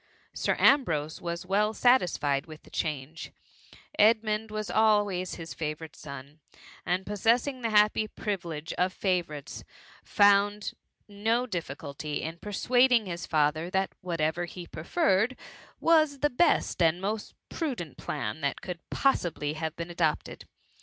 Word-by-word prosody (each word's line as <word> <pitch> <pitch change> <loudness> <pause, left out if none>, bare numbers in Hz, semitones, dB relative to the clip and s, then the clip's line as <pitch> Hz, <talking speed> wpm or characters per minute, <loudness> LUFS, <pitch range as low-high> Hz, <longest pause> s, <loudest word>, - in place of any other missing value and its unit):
Sir - - 0
Ambrose 160 - +3
was 170 0 -4
well 210 +3 +1
satisfied 170 - +2
with 155 -1 -11
the - - -18
change; 150 0 -4 0.7
Edmund 215 0 +3
was 215 0 -4
always 205 -4 +2
his 165 -1 -7
favourite 155 0 -5
son, 140 +1 -10 0.5
and 185 +2 0
pos 205 -1 -5
sessing 250 +3 +2
the 230 - -1
happy 210 0 +4
privilege 170 -7 -4
of 185 +1 +2
favourites, 175 -8 -2 0.4
found 205 +1 +3 0.3
no 220 +4 0
difficulty 150 - -5
in 165 +2 -5
persuading 245 +4 +3
his 170 -2 -5
father 155 +2 +1
that 190 +1 0
what* 175 -2 -4
ever 160 +3 0
he 175 0 -9
preferred, 220 - +1 0.4
was 310 -4 +3
the 295 - +2
best 250 - +2
and 165 +1 +3
most 205 +3 -4 0.2
pru 310 -6 -2
dent 165 - -8
plan 105 +9 -4
that 140 -1 -1
could 180 -2 -6
possibly 165 - 0
have 160 0 -4
been 170 +1 -6
adopted. 165 -3 -1
185 Hz, 140 wpm, -28 LUFS, 160-215 Hz, 0.7 s, happy